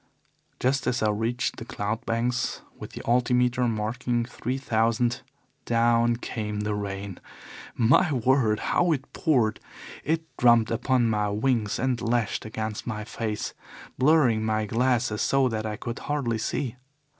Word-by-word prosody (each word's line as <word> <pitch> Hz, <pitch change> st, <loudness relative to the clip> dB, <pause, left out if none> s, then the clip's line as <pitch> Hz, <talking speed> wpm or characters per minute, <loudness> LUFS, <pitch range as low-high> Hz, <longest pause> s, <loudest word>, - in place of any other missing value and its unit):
Just 130 Hz, +1 st, +1 dB
as 120 Hz, -, 0 dB
I 105 Hz, -, +3 dB
reached 115 Hz, +4 st, -1 dB
the -, -, -6 dB
cloud 110 Hz, +3 st, -4 dB
banks, 120 Hz, +2 st, -1 dB
with -, -, -10 dB
the -, -, -7 dB
altimeter 125 Hz, +1 st, +2 dB
marking 120 Hz, +2 st, -1 dB
three 125 Hz, +1 st, -4 dB
thousand, 115 Hz, -1 st, +1 dB, 0.4 s
down 115 Hz, 0 st, +3 dB
came 105 Hz, -3 st, -4 dB
the 105 Hz, 0 st, -1 dB
rain. 100 Hz, -2 st, -5 dB, 0.6 s
My 135 Hz, +8 st, +4 dB
word, 125 Hz, -4 st, +2 dB
how 175 Hz, -2 st, +3 dB
it 135 Hz, -2 st, -6 dB
poured! 120 Hz, -9 st, +1 dB, 0.4 s
It 160 Hz, +1 st, 0 dB
drummed 120 Hz, -2 st, +5 dB
upon 120 Hz, +1 st, +2 dB
my 105 Hz, -1 st, 0 dB
wings 110 Hz, 0 st, 0 dB
and 125 Hz, -1 st, 0 dB
lashed 115 Hz, -2 st, 0 dB
against 110 Hz, 0 st, -4 dB
my 105 Hz, -3 st, -3 dB
face, 110 Hz, -1 st, -4 dB, 0.5 s
blurring 130 Hz, -6 st, +4 dB
my 110 Hz, 0 st, 0 dB
glasses 120 Hz, -1 st, +1 dB
so 135 Hz, -1 st, +3 dB
that 110 Hz, -1 st, -3 dB
I 105 Hz, -, -3 dB
could 115 Hz, +2 st, -5 dB
hardly 130 Hz, -7 st, -1 dB
see. 125 Hz, +2 st, -2 dB
115 Hz, 145 wpm, -26 LUFS, 110-125 Hz, 0.6 s, drummed